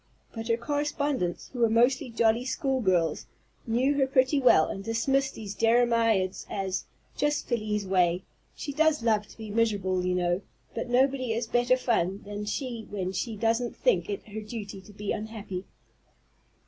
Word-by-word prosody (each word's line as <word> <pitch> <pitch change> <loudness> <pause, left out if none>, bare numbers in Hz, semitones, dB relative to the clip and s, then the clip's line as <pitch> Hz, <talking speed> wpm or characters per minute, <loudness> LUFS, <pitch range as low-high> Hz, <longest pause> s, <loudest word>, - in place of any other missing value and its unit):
But 225 -1 -5
her 230 -1 +2
correspondents, 285 - -2
who 250 - -6
were 230 -1 +4
mostly 245 +4 +3
jolly 230 0 +2
school 265 0 -1
girls, 175 -6 +1 0.4
knew 250 +5 +2
her 270 - +3
pretty 265 +2 +3
well, 250 -11 +6
and 195 - -5
dismissed 270 +5 0
these 205 -3 -6
jeremiads 230 -4 +2
as, 190 -2 -2 0.3
"Just 295 0 0
Felie's 215 -4 -1
way. 180 -1 +2 0.3
She 285 - -5
does 310 -2 +2
love 215 -3 +2
to - - -16
be 220 -2 -7
miserable, 200 -5 +1
you 180 0 0
know, 175 +1 +1 0.3
but - - -4
nobody 255 -1 +2
is 230 +1 -1
better 245 +2 +2
fun 200 -6 0
than 205 0 -5
she 235 0 -4
when 190 -3 -3
she 215 +4 -3
doesn't 230 +3 0
think - - +1
it 405 - -4
her 215 +1 -5
duty 210 -2 -7
to 190 - -15
be 205 0 -4
unhappy." 210 -4 -5
225 Hz, 165 wpm, -28 LUFS, 200-255 Hz, 0.4 s, well